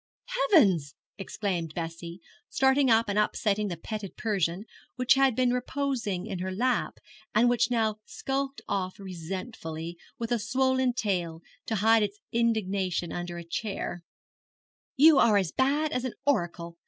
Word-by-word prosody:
'Heavens!' 185 - +4 0.2
exclaimed 185 -5 -3
Bessie, 170 +1 -6 0.3
starting 265 0 +3
up 225 0 +4
and 205 +1 +1
upsetting 210 0 +1
the 175 -3 -4
petted 210 +2 -6
Persian, 195 -2 -1 0.3
which 250 0 +4
had 270 -3 +3
been 250 0 +2
reposing 250 -7 -2
in 195 -5 -5
her 185 +1 -3
lap, 240 +5 0 0.4
and 230 +3 +5
which 240 -1 +2
now 220 -3 +1
skulked 275 +3 -3
off 190 -2 -2
resentfully, 175 -2 -6 0.2
with 230 0 -4
a 240 - +2
swollen 260 +3 +1
tail, 175 -8 -2 0.2
to 225 - -1
hide 220 +2 +4
its 205 0 -2
indignation 200 -7 0
under 175 0 -5
a 170 - -6
chair, 175 0 -4 1.0
'you 300 +1 +7
are 215 -3 +5
as 190 -5 0
bad 290 +4 +1
as 250 -4 -1
an 255 - -4
oracle. 170 -9 -1
210 Hz, 145 wpm, -28 LUFS, 180-250 Hz, 1.0 s, you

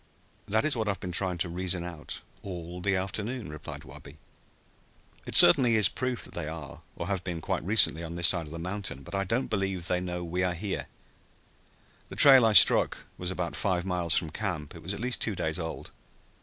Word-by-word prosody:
"That 110 +7 +1
is 155 - +1
what 110 -2 -2
I - - 0
have 100 - -3
been 90 - -6
trying 90 0 +1
to 85 - -2
reason 90 0 -3
out 85 -4 -6 0.2
all 90 -2 -8
the 95 +1 0
afternoon," 105 +3 -4
replied 75 -2 -9
Wabi. 70 - -14 1.1
"It - - -2
certainly 125 -8 +7
is 105 -4 +4
proof 130 -2 -3
that - - -8
they 85 -3 -5
are, 80 -2 -8
or - - -5
have 95 -1 -3
been 85 -3 -5
quite - - -3
recently, 95 -4 +4
on 85 0 -7
this 85 -1 +4
side 85 -4 -1
of - - -12
the 85 - -7
mountain. 90 -5 -5
But - - -12
I 95 0 -1
don't 115 +7 -1
believe 95 -4 -3
they 90 0 -1
know 90 -1 -5
we 90 +2 -3
are 90 -1 0
here. 95 +3 -5 1.2
The - - -8
trail 130 -5 +9
I 110 - +2
struck 90 - +5
was 90 - -4
about 90 -2 -4
five 90 -3 -1
miles 90 -3 +1
from 80 -3 -1
camp. 85 -7 -4
It - - -12
was 95 +5 -4
at - - -9
least 125 +2 -3
two 105 - -1
days 80 -1 -2
old. 80 -1 -7
90 Hz, 215 wpm, -28 LUFS, 85-100 Hz, 1.2 s, trail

